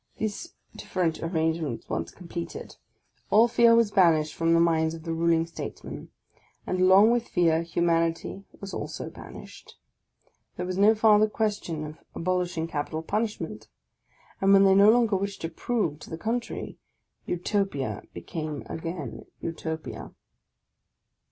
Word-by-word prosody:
These 215 +11 -4 0.2
different 170 -4 -2
arrangements 160 -5 -1
once - - -3
completed, 170 -1 -7 0.5
all 225 +3 +6
fear 235 0 +5
was 230 -3 +3
banished 165 -6 +4
from 165 0 +2
the - - +5
minds 165 -1 +2
of 160 - -11
the 165 -1 -3
ruling 165 0 +2
statesmen; 165 - -8 0.6
and 185 0 -1
along 190 +4 +7
with 240 -1 0
fear 165 -2 +2
humanity 165 +2 0 0.2
was 195 -1 -7
also - - -5
banished. - - -12 0.8
There 180 - -4
was 185 +1 -3
no 215 +2 +6
farther 215 -1 +5
question 205 -8 -2
of 155 +2 -9 0.2
abolishing 180 -2 -1
capital 155 0 -3
punishment; 165 - -3 0.7
and, 195 0 +4
when 195 0 +7
they 195 -1 +6
no 200 +2 +7
longer 230 -2 +4
wished 200 +1 -3
to 165 - -3
prove 170 -4 -2
to - - -11
the 160 - -5
contrary, 235 +6 -4 0.5
Utopia 175 - -1
became 150 - -5
again 160 -6 -6
Utopia! 160 -1 -6
170 Hz, 135 wpm, -27 LUFS, 160-205 Hz, 0.8 s, along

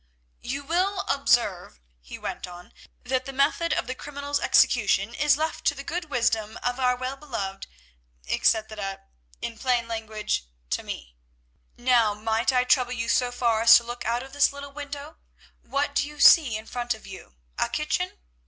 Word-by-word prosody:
"You 275 +3 -4
will 370 +6 0
observe," 235 - +1 0.2
he - - -10
went - - -5
on, 175 0 -12 0.3
"that 255 0 -1
the 275 - -5
method 280 +5 +1
of - - 0
the 255 - -4
criminal's 285 +1 -4
execution - - +3
is 295 -2 +3
left 315 +1 -2
to 285 - +3
the 275 - -7
good 340 +4 -3
wisdom 225 -6 0
of 245 +1 -1
our 250 -1 +3
well 255 +2 -4
beloved—etc., 195 - -3 0.4
in 230 -1 -5
plain 245 -2 +1
language, 215 - -3 0.3
to - - 0
me. 60 -1 -8 0.6
Now 240 -4 +3
might 220 +3 0
I 250 -1 +3
trouble 250 -1 +2
you 230 -1 -3
so 245 0 +2
far 235 -3 +1
as 230 0 +9
to 235 - -2
look 240 +1 -6
out 235 +2 -1
of 270 0 -13
this 285 0 +4
little 280 0 -9
window? 290 +1 -8 0.4
What 285 +1 -2
do 285 - +1
you 295 0 -12
see 275 -10 +7
in 220 - -10
front 240 0 -2
of 220 - -15
you? 190 - -11 0.2
A - - +1
kitchen? - - -2
245 Hz, 170 wpm, -26 LUFS, 220-280 Hz, 0.6 s, as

